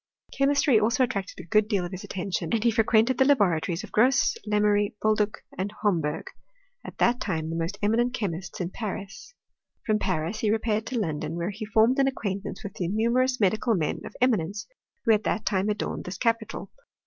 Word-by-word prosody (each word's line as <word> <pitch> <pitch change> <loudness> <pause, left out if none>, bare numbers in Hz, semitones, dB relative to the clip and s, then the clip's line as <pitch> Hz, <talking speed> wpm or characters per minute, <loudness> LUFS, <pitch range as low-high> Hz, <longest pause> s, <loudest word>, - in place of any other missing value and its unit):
Chemistry 275 -3 +3
also 230 +4 +2
attracted 200 -6 -3
a - - -8
good 210 +4 +3
deal 200 -5 0
of 175 - -7
his 185 -1 -7
attention, 180 -3 -3
s^nd 220 +2 0
he 235 - +4
fre 225 +1 +3
quented 225 +3 +3
the - - +7
laboratories 185 - +2
of - - -10
Grosse, 250 +4 +3
Lemery, 210 -1 +2
Boldue, 215 -1 +2 0.3
and 195 +2 -2
Homberg, 165 -7 0 0.6
at - - -10
that 240 +1 +2
time 160 -5 -2
the - - -3
most 165 +4 -2
eminent 235 +4 +2
chexQists 190 -6 -4
in 180 -1 -3
Paris. 205 - -6 0.5
From 215 -1 +2
Paris 180 +2 -1
he 215 - +1
repaired 220 0 0
to 255 - -3
London, 160 -4 -2
where 170 +3 -2
he 215 +2 -6
formed 225 +4 +3
an 270 - +4
acquaintance 205 -3 -4
with 200 -2 -6
the 175 - -3
numerous 235 +6 +1
medical 220 +3 +2
men 160 -5 -1
qf - - -10
eminence 205 -4 +1 0.4
who 230 - +5
at 210 - +2
that 215 - -1
time 195 +1 +1
adorned 210 -1 -3
this 180 0 -5
capital. 230 -2 -1
210 Hz, 195 wpm, -26 LUFS, 185-230 Hz, 0.6 s, the